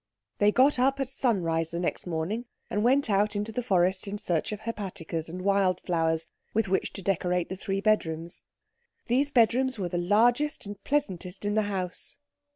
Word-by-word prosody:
They 205 Hz, 0 st, +5 dB
got 260 Hz, +3 st, +4 dB
up 270 Hz, +2 st, +2 dB
at 270 Hz, -, 0 dB
sunrise 170 Hz, -11 st, 0 dB
the 170 Hz, -, -3 dB
next 175 Hz, -, -2 dB
morning, 175 Hz, +8 st, -2 dB, 0.3 s
and 210 Hz, -, 0 dB
went 270 Hz, +4 st, +4 dB
out 210 Hz, 0 st, +2 dB
into 210 Hz, +2 st, -2 dB
the 245 Hz, -, -2 dB
forest 190 Hz, -3 st, +1 dB
in 200 Hz, +1 st, -3 dB
search 175 Hz, -4 st, -1 dB
of 210 Hz, 0 st, -5 dB
hepaticas 185 Hz, -7 st, -4 dB
and 180 Hz, +2 st, -6 dB
windflowers 180 Hz, -4 st, +1 dB, 0.3 s
with 225 Hz, -2 st, +2 dB
which 190 Hz, +1 st, 0 dB
to 195 Hz, -, -5 dB
decorate 180 Hz, -2 st, 0 dB
the 190 Hz, -, -3 dB
three 195 Hz, +1 st, -3 dB
bedrooms. 170 Hz, -6 st, 0 dB, 0.6 s
These 270 Hz, +4 st, +3 dB
bedrooms 255 Hz, 0 st, +3 dB
were 185 Hz, -4 st, -2 dB
the 175 Hz, -, -1 dB
largest 235 Hz, +11 st, +2 dB
and 205 Hz, -1 st, -8 dB
pleasantest 190 Hz, -, -2 dB
in 205 Hz, -, 0 dB
the 215 Hz, -, +3 dB
house. 185 Hz, -3 st, -4 dB
200 Hz, 175 wpm, -28 LUFS, 175-230 Hz, 0.6 s, They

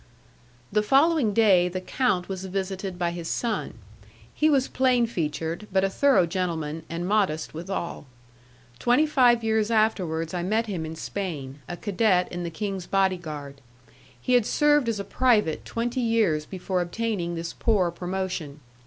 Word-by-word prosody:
The 210 Hz, -, +3 dB
following 275 Hz, +1 st, +3 dB
day 195 Hz, -5 st, +4 dB
the 185 Hz, +1 st, -3 dB
count 185 Hz, -2 st, 0 dB
was 190 Hz, -1 st, -5 dB
visited 190 Hz, 0 st, -4 dB
by 175 Hz, -1 st, 0 dB
his 170 Hz, -1 st, -6 dB
son; 225 Hz, +4 st, -2 dB, 0.6 s
he 310 Hz, -, +2 dB
was 275 Hz, -3 st, +3 dB
plain 255 Hz, -2 st, +2 dB
featured, 165 Hz, -1 st, -3 dB
but 190 Hz, 0 st, +2 dB
a 195 Hz, -, +1 dB
thorough 275 Hz, -6 st, +4 dB
gentleman, 165 Hz, -3 st, -3 dB
and 170 Hz, +2 st, -3 dB
modest 190 Hz, -7 st, 0 dB
withal. 170 Hz, -2 st, -5 dB, 0.7 s
Twenty 245 Hz, +6 st, +3 dB
five 245 Hz, -6 st, +4 dB
years 220 Hz, -1 st, +1 dB
afterwards 185 Hz, -8 st, 0 dB
I 175 Hz, -, -1 dB
met 215 Hz, +6 st, 0 dB
him 180 Hz, -7 st, -4 dB
in 160 Hz, -, -6 dB
Spain, 155 Hz, -7 st, -5 dB
a 175 Hz, -, -5 dB
cadet 195 Hz, -3 st, +1 dB
in 175 Hz, -, -4 dB
the 170 Hz, -, -3 dB
king's 195 Hz, 0 st, -4 dB
body 190 Hz, -1 st, +2 dB
guard. 145 Hz, -4 st, -8 dB, 0.6 s
He 255 Hz, -, -1 dB
had 245 Hz, -3 st, +4 dB
served 295 Hz, -4 st, +3 dB
as 220 Hz, -3 st, -2 dB
a -, -, -2 dB
private 215 Hz, -9 st, +1 dB
twenty 240 Hz, +2 st, -2 dB
years 215 Hz, -10 st, +1 dB
before 185 Hz, -1 st, -2 dB
obtaining 175 Hz, -2 st, -2 dB
this 165 Hz, 0 st, -5 dB
poor 195 Hz, -6 st, +1 dB
promotion. 180 Hz, -4 st, -4 dB
190 Hz, 160 wpm, -25 LUFS, 170-225 Hz, 0.7 s, day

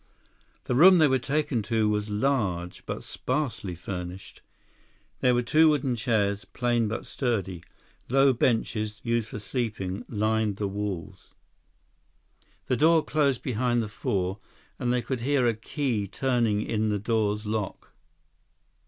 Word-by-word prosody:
The -, -, -2 dB
room 180 Hz, +8 st, +8 dB
they 155 Hz, -3 st, +6 dB
were 130 Hz, -1 st, +2 dB
taken 140 Hz, -2 st, 0 dB
to 110 Hz, +1 st, +1 dB
was 105 Hz, 0 st, -1 dB
large, 105 Hz, -7 st, -1 dB
but -, -, -4 dB
sparsely 115 Hz, -, -3 dB
furnished. 90 Hz, +1 st, -7 dB, 0.8 s
There 125 Hz, -1 st, +3 dB
were 120 Hz, -, +1 dB
two 155 Hz, +6 st, +5 dB
wooden 135 Hz, -4 st, +1 dB
chairs, 110 Hz, -4 st, 0 dB
plain 120 Hz, -2 st, 0 dB
but 110 Hz, -, -4 dB
sturdy. 100 Hz, -9 st, -2 dB, 0.5 s
Low 135 Hz, +1 st, +5 dB
benches, 110 Hz, -3 st, 0 dB
used 115 Hz, -2 st, 0 dB
for -, -, -6 dB
sleeping, 105 Hz, -3 st, -3 dB
lined 110 Hz, -1 st, 0 dB
the 100 Hz, 0 st, -2 dB
walls. 100 Hz, -4 st, -5 dB, 1.3 s
The 125 Hz, -, +1 dB
door 160 Hz, +1 st, +4 dB
closed 140 Hz, -4 st, +1 dB
behind 120 Hz, -1 st, 0 dB
the -, -, -4 dB
four, 95 Hz, -1 st, -2 dB, 0.4 s
and 120 Hz, -, 0 dB
they 125 Hz, -1 st, +1 dB
could 130 Hz, -3 st, -3 dB
hear 135 Hz, 0 st, +2 dB
a 115 Hz, -, +3 dB
key 115 Hz, -2 st, -2 dB
turning 115 Hz, -2 st, 0 dB
in 110 Hz, -1 st, 0 dB
the 105 Hz, -, +1 dB
door's 105 Hz, 0 st, 0 dB
lock. 105 Hz, -2 st, -4 dB
115 Hz, 140 wpm, -27 LUFS, 105-130 Hz, 1.3 s, room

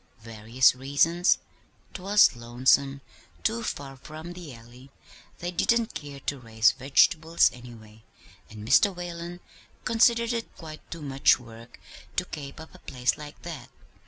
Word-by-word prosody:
"Various 115 Hz, +3 st, +2 dB
reasons. 145 Hz, +7 st, +2 dB, 0.6 s
'Twas 195 Hz, -5 st, +4 dB
lonesome; 130 Hz, +4 st, +1 dB, 0.4 s
too 230 Hz, +1 st, 0 dB
far 140 Hz, -10 st, -5 dB
from 155 Hz, +6 st, -9 dB
the 175 Hz, -4 st, -10 dB
Alley; 120 Hz, +3 st, -14 dB, 0.5 s
they 175 Hz, +1 st, -4 dB
didn't 230 Hz, +5 st, +1 dB
care 145 Hz, -2 st, -8 dB
to 140 Hz, +1 st, -3 dB
raise 115 Hz, -1 st, +3 dB
vegetables, 155 Hz, +6 st, +3 dB
any 120 Hz, -1 st, -11 dB
way, 110 Hz, 0 st, -16 dB, 0.5 s
and 105 Hz, 0 st, -10 dB
Mr. 155 Hz, -, +4 dB
Whalen 175 Hz, 0 st, -7 dB, 0.4 s
considered 235 Hz, 0 st, +3 dB
it 230 Hz, -1 st, -5 dB
quite 155 Hz, -2 st, -10 dB
too 165 Hz, -2 st, -7 dB
much 135 Hz, -1 st, +3 dB
work 115 Hz, -1 st, -14 dB, 0.4 s
to 180 Hz, -, 0 dB
'kape 140 Hz, -5 st, -8 dB
up 160 Hz, -, -12 dB
a 185 Hz, -, -15 dB
place 125 Hz, -5 st, -1 dB
like 150 Hz, 0 st, -11 dB
that.' 155 Hz, -8 st, -8 dB
140 Hz, 140 wpm, -26 LUFS, 125-175 Hz, 0.6 s, Twas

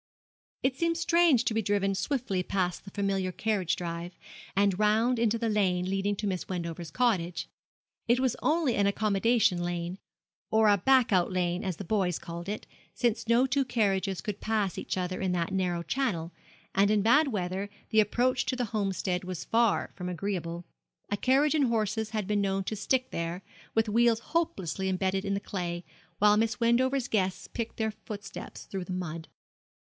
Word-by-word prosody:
It 260 Hz, -1 st, +2 dB
seemed 335 Hz, +3 st, 0 dB
strange 335 Hz, -7 st, +4 dB
to 225 Hz, -, +1 dB
be 225 Hz, -, +1 dB
driven 195 Hz, -1 st, +1 dB
swiftly 195 Hz, -1 st, -1 dB
past 180 Hz, -1 st, -2 dB
the -, -, -8 dB
familiar 195 Hz, -2 st, -1 dB
carriage 200 Hz, -3 st, 0 dB
drive, 170 Hz, 0 st, -5 dB, 0.4 s
and 200 Hz, -1 st, +2 dB
round 220 Hz, +3 st, +3 dB
into 230 Hz, -1 st, +2 dB
the 230 Hz, 0 st, -1 dB
lane 185 Hz, -4 st, +1 dB
leading 195 Hz, +2 st, 0 dB
to 210 Hz, -, -4 dB
Miss 185 Hz, -3 st, -2 dB
Wendover's 170 Hz, -2 st, -4 dB
cottage. 180 Hz, -6 st, 0 dB, 0.6 s
It 240 Hz, +2 st, +4 dB
was 260 Hz, -2 st, +1 dB
only 310 Hz, -5 st, +2 dB
an 200 Hz, -1 st, +3 dB
accommodation 210 Hz, -1 st, +2 dB
lane 175 Hz, +1 st, -3 dB, 0.5 s
or 220 Hz, -1 st, +4 dB
a 205 Hz, -, +5 dB
back 260 Hz, +1 st, +4 dB
out 180 Hz, -1 st, +3 dB
lane, 180 Hz, +1 st, 0 dB
as 185 Hz, -3 st, -2 dB
the -, -, -5 dB
boys 185 Hz, -3 st, +1 dB
called 170 Hz, +1 st, -7 dB
it, 210 Hz, -, -4 dB, 0.3 s
since 235 Hz, -2 st, 0 dB
no 235 Hz, +3 st, +4 dB
two 275 Hz, +1 st, +1 dB
carriages 195 Hz, -6 st, 0 dB
could 205 Hz, -2 st, -5 dB
pass 215 Hz, -4 st, 0 dB
each -, -, -3 dB
other 185 Hz, 0 st, -2 dB
in 185 Hz, -1 st, 0 dB
that 175 Hz, +1 st, -1 dB
narrow 180 Hz, -3 st, 0 dB
channel 175 Hz, -10 st, -1 dB, 0.4 s
and 200 Hz, +1 st, +4 dB
in 210 Hz, -1 st, +3 dB
bad 285 Hz, +8 st, +5 dB
weather 195 Hz, -3 st, -2 dB, 0.2 s
the 220 Hz, -, +4 dB
approach 245 Hz, +5 st, +2 dB
to 260 Hz, -, 0 dB
the 250 Hz, -1 st, -1 dB
Homestead 190 Hz, -3 st, -1 dB
was 180 Hz, -2 st, -5 dB
far 230 Hz, -2 st, +2 dB
from 180 Hz, -1 st, -5 dB
agreeable. 175 Hz, -2 st, -3 dB, 0.5 s
A -, -, +2 dB
carriage 275 Hz, +7 st, +3 dB
and 300 Hz, -3 st, +3 dB
horses 220 Hz, -1 st, 0 dB
had 215 Hz, -2 st, -2 dB
been 205 Hz, +1 st, +1 dB
known 195 Hz, 0 st, 0 dB
to 215 Hz, -, -3 dB
stick 255 Hz, +5 st, 0 dB
there, 170 Hz, +3 st, -3 dB, 0.3 s
with 225 Hz, 0 st, +3 dB
wheels 230 Hz, +1 st, +3 dB
hopelessly 190 Hz, -, 0 dB
embedded 190 Hz, +1 st, 0 dB
in 200 Hz, 0 st, 0 dB
the -, -, -1 dB
clay, 175 Hz, -3 st, -4 dB, 0.3 s
while 210 Hz, 0 st, +5 dB
Miss 225 Hz, +2 st, +1 dB
Wendover's 250 Hz, +2 st, +2 dB
guests 190 Hz, -5 st, 0 dB
picked 230 Hz, -1 st, -5 dB
their 220 Hz, -1 st, 0 dB
footsteps 205 Hz, -2 st, -8 dB
through 190 Hz, -2 st, -5 dB
the 185 Hz, -, -5 dB
mud. 165 Hz, -3 st, -4 dB
200 Hz, 180 wpm, -29 LUFS, 185-230 Hz, 0.6 s, a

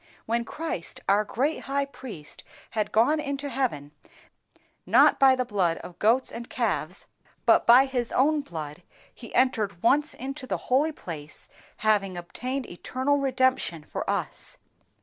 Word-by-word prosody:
When 235 Hz, +1 st, 0 dB
Christ, 305 Hz, -, -4 dB
our 200 Hz, +2 st, +4 dB
great 270 Hz, +9 st, -1 dB
High 280 Hz, +1 st, 0 dB
Priest, 235 Hz, -, -9 dB, 0.3 s
had 215 Hz, -2 st, -1 dB
gone 240 Hz, +8 st, +3 dB
into 280 Hz, -1 st, -3 dB
heaven, 230 Hz, -, -2 dB, 1.0 s
_neither -, -, +5 dB
by 265 Hz, -1 st, +7 dB
the 255 Hz, -1 st, -1 dB
blood, 190 Hz, -7 st, 0 dB
of 175 Hz, -, -11 dB
goats 235 Hz, +5 st, +3 dB
and 235 Hz, +1 st, -7 dB
calves, -, -, -2 dB, 0.4 s
but -, -, +4 dB
by 250 Hz, +3 st, +8 dB
His 250 Hz, -3 st, -2 dB
own 295 Hz, +3 st, +3 dB
blood 160 Hz, -, -7 dB, 0.3 s
He 235 Hz, -, -12 dB
entered 220 Hz, -8 st, +1 dB
once 290 Hz, +6 st, +3 dB
into 270 Hz, +1 st, -6 dB
the -, -, -1 dB
holy 280 Hz, +5 st, +1 dB
place, 160 Hz, -, -8 dB, 0.4 s
having 195 Hz, -4 st, +2 dB
obtained 255 Hz, +9 st, -4 dB
eternal 260 Hz, +10 st, -1 dB
redemption 260 Hz, -, +1 dB
for -, -, -5 dB
us. -, -, -2 dB
250 Hz, 145 wpm, -26 LUFS, 195-275 Hz, 1.0 s, by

